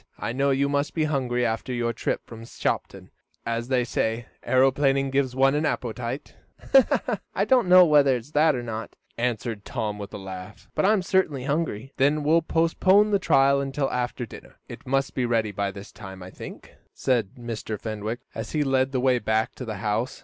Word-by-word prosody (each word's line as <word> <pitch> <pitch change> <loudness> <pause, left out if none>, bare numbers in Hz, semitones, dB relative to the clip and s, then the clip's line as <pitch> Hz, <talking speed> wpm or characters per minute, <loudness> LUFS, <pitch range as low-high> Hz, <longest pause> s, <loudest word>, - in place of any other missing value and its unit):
I 115 - -3
know 140 +2 +1
you 140 +1 +2
must 140 +1 -1
be 160 - +1
hungry 125 -5 0
after 115 +3 -2
your 120 -1 -1
trip - - -2
from 115 -1 -10
Shopton, 115 - -4 0.3
as 115 +1 -2
they 130 -2 +2
say 115 0 -1 0.2
aeroplaning 135 +1 +2
gives 135 -2 0
one 135 +1 +4
an 150 +1 0
appetite." 125 -2 -3 1.0
"I 200 - +2
don't 245 -2 +3
know 180 0 +9
whether 145 -4 +5
it's 125 +4 -7
that 155 0 +4
or 120 - -4
not," 115 -1 -6 0.2
answered 115 -3 -2
Tom 105 -1 -3
with 100 - -7
a - - -6
laugh, 95 0 -9
"but - - +1
I 210 - +5
am 200 -4 +1
certainly 175 -8 +1
hungry." 140 -4 -2
"Then 145 +2 +2
we'll 160 +3 +4
postpone 185 +6 +3
the 200 - +3
trial 140 -5 +4
until 135 0 -2
after 125 0 -2
dinner. 110 - -13
It - - -11
must 135 +1 0
be 130 - -1
ready 115 -3 +1
by 100 0 -2
this 100 0 -10
time, 95 -1 -10
I 90 - -10
think," - - -10 0.2
said 120 -3 0
Mr. 115 -3 -5
Fenwick, 110 +1 -4
as 110 0 -6
he 150 - +2
led 135 -1 +1
the 130 - +1
way 125 -1 +3
back 110 0 0
to 125 - -7
the 110 -3 -5
house. 110 +4 -1
130 Hz, 195 wpm, -25 LUFS, 115-140 Hz, 1.0 s, know